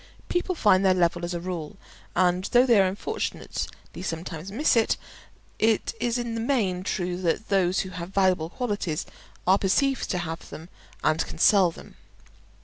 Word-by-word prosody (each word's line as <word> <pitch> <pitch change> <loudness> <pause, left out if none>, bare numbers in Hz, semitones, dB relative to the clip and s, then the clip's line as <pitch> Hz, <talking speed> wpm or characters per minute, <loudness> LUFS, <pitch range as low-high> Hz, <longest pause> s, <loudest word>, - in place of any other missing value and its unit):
People 355 +1 0
find 200 - +4
their 190 -1 +4
level 175 -1 +1
as 175 +1 -3
a - - -2
rule; 175 0 -5 0.4
and 180 +1 +2
though 245 +3 +4
they 235 -6 +5
unfortunately 195 - -4
sometimes 170 0 -5
miss 275 +8 +2
it, 225 -1 +3 0.6
it 220 -1 +2
is 240 0 0
in 240 -1 -3
the 225 - -2
main 220 -8 0
true 180 -2 -2
that 180 +4 -1
those 190 -2 +2
who 190 - -6
have 170 -1 -6
valuable 185 -4 +2
qualities 205 -8 -2 0.4
are 190 +2 +4
perceived 270 +7 +1
to 180 - 0
have 165 -1 -5
them 160 +3 -10 0.3
and 155 0 +2
can - - -8
sell 190 +1 +5
them. 165 - -13
185 Hz, 165 wpm, -26 LUFS, 175-220 Hz, 0.6 s, they